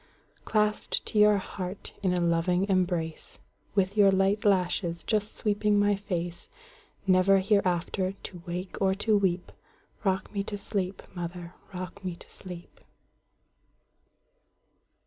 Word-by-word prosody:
Clasped 210 -1 +1
to 215 - 0
your 210 0 +6
heart 185 0 -5
in 190 -2 +2
a 180 - +1
loving 175 +2 +2
embrace, 175 -4 -1 0.4
With 195 0 +2
your 205 -2 +6
light 195 +2 +2
lashes 180 -3 +1
just 215 -1 0
sweeping 210 0 +1
my 205 0 +3
face, 175 -4 -4 0.6
Never 190 +1 +5
hereafter 190 -1 +1
to 180 -2 -9
wake 180 +3 -5
or 190 -1 +3
to 215 +2 +2
weep;—Rock 190 +1 -2
me 200 - 0
to 205 +1 -4
sleep, 195 -2 -3
mother,—rock 180 +2 -7
me 180 -2 -3
to - - -14
sleep! 180 -2 -10
190 Hz, 120 wpm, -28 LUFS, 180-205 Hz, 0.6 s, your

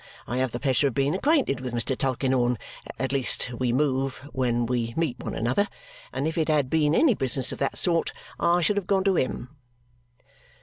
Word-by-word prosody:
I 120 - -3
have 130 -1 0
the 120 - -4
pleasure 140 +1 +2
of 130 - -4
being 140 +2 +1
acquainted 255 - +1
with 125 -2 -4
Mr. 125 +3 0
Tulkinghorn 130 -2 0 0.4
at 130 -1 -2
least 135 -2 0
we 125 -2 +1
move 135 0 -1
when 120 -2 0
we 115 -1 -2
meet 155 -7 -1
one - - -5
another 130 - +1 0.4
and 145 - -2
if 160 +1 -2
it 160 - +1
had 150 -4 +1
been 155 -1 +2
any 305 -7 +5
business 130 - +2
of - - -7
that 140 - -1
sort, 170 -2 +2 0.3
I 175 +1 +3
should 205 +4 +1
have 195 -3 -2
gone 195 -2 +2
to 195 -1 +2
him." 130 -4 -2
135 Hz, 200 wpm, -26 LUFS, 125-160 Hz, 0.4 s, any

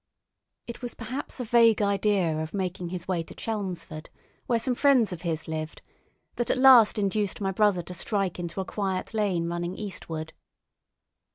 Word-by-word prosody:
It 235 +1 -8
was 245 -1 -5
perhaps 255 +5 -6
a - - -1
vague 230 -1 +5
idea 200 -5 +1
of 160 +4 -5
making 180 -2 -3
his 180 -1 -6
way 180 -3 0
to 165 - -10
Chelmsford, 185 -7 -5 0.4
where 235 - +2
some 250 +3 0
friends 250 -6 +3
of 170 - -8
his 165 -3 -3
lived, 155 0 -5 0.5
that 240 - -1
at - - +2
last 255 -5 +7
induced 205 0 0
my 195 -2 -1
brother 195 -2 +2
to 180 - -8
strike 195 0 -1
into 170 +1 -4
a - - -5
quiet 195 0 -3
lane 195 -6 0
running 175 +1 -3
eastward. 160 -6 -6
195 Hz, 170 wpm, -27 LUFS, 175-220 Hz, 0.5 s, last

